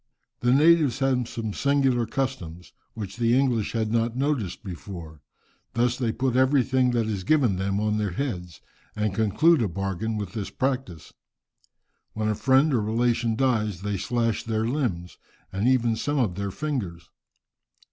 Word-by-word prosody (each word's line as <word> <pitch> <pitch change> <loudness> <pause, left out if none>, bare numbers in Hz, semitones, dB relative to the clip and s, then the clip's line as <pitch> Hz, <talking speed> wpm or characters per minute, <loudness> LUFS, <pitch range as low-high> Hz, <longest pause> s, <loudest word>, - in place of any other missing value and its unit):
The 120 - +2
natives 150 -2 +5
have 130 -3 0
some 110 -3 -4
singular 135 -4 +2
customs, 95 - -4 0.2
which 105 -2 -6
the 120 +1 +3
English 120 -6 0
had 110 -2 -1
not 115 0 0
noticed 130 - -1
before. 85 -5 -8 0.5
Thus 120 +1 +2
they 120 -3 -1
put 130 +1 -1
everything 130 -1 +3
that 115 -2 +1
is 105 -4 -3
given 125 -6 +2
them 100 +1 -1
on 105 0 0
their 105 -1 0
heads, 90 - -4 0.3
and 105 -2 -1
conclude 115 - +3
a 110 - +1
bargain 95 +4 -3
with 100 -3 -5
this 105 -3 -4
practice. 130 - -3 1.0
When 110 0 -1
a - - +2
friend 135 +6 +3
or 120 - +2
relation 115 +1 +1
dies, 110 -7 0
they 105 -1 -1
slash 115 +1 0
their 110 -1 -1
limbs, 115 - -2 0.3
and 100 +5 0
even 120 -3 +3
some 145 +6 -2
of 115 -9 +1
their 100 +2 -3
fingers. 100 - -4
115 Hz, 155 wpm, -25 LUFS, 100-130 Hz, 1.0 s, natives